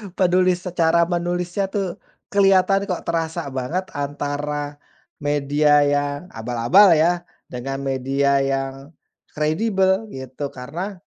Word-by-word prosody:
Penulis 180 -1 +2
secara 170 -2 +2
menulisnya, 175 +2 -1
tuh, 195 -3 -3 0.3
kelihatan 195 0 +3
kok, 180 - -3
terasa 165 -2 -2
banget 130 +8 -2
antara 145 0 -4 0.4
media 145 0 +3
yang 145 0 0
abal-abal, 125 - +4
ya, 175 +3 +1 0.2
dengan 135 +2 -5
media 135 +1 +1
yang 135 +2 -3 0.4
kredibel, 190 +6 +1
gitu, 130 - -6
karena, 170 +11 -5
150 Hz, 105 wpm, -21 LUFS, 140-180 Hz, 0.4 s, abal-abal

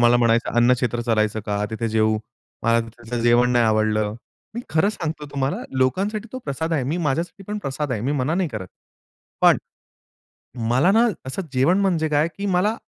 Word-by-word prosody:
मला 120 0 +5
म्हणायचं 115 -1 +2
अन्न 120 +1 +5
क्षेत्र 120 -1 -1
चालायचं 110 -2 +1
का, 105 0 -1
तिथे 115 +1 -2
जेवू, 110 0 +2 0.4
मला 115 +1 +3
तिथे 120 +1 -6
जेवण 120 +1 +4
नाही 120 -1 +4
आवडलं. 110 -1 +1 0.4
मी 235 - -3
खरं 160 +5 +3
सांगतो 160 -7 -4
तुम्हाला. 135 0 -1 0.2
लोकांसाठी 200 - 0
तो 260 - -4
प्रसाद 160 +5 -3
आहे. 150 -5 +1
मी 150 +7 -1
माझ्यासाठी 165 +7 -2
पण 210 0 -2
प्रसाद 140 -5 -3
आहे. 110 - -2
मी 130 +6 -1
मना 145 +2 0
नाही 180 -1 0
करत. 105 -8 -6 0.7
पण - - +6 1.1
मला 130 +10 +4
ना 230 +3 +5 0.2
असं 135 +9 -3
जेवण 145 +9 +3
म्हणजे 175 -5 +1
काय 150 +1 +2
की 200 - -3
मला 200 +4 +1
130 Hz, 180 wpm, -22 LUFS, 115-165 Hz, 1.1 s, पण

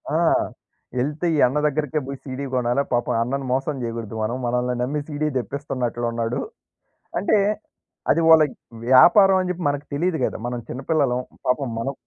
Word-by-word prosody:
ఆ! - - +4 0.8
యెళ్తే 150 +7 -1
ఈ - - +1
అన్న 135 +4 -2
దగ్గరికే 150 0 -1
బోయి 140 -1 -5
సీడీ 135 +1 -5
కొనాలా. 125 +2 +1
పాపం 120 0 +1
అన్నను 135 +2 -3
మోసం 135 +2 -1
జెయగూడదు 115 -2 -5
మనం. 120 +4 -1
మనలని 125 +1 0
నమ్మి 145 +3 -1
సీడీ 150 0 -2
తెప్పిస్తన్నట్లున్నాడు. 120 -2 -2 0.8
అంటే, 215 - +3 0.7
అది 165 - +3
వాళ్ళకి 155 -3 +6 0.3
వ్యాపారవని 185 +8 +6
జెప్పి 180 0 -5
మనకి 145 0 -3
తెలీదు 170 +2 0
గదా! - - -4
మనం 120 -1 -3
చిన్నపిల్లలం. 135 -1 0 0.3
పాపం 130 0 +1
మనం 135 +4 -2
135 Hz, 145 wpm, -23 LUFS, 125-150 Hz, 0.8 s, వాళ్ళకి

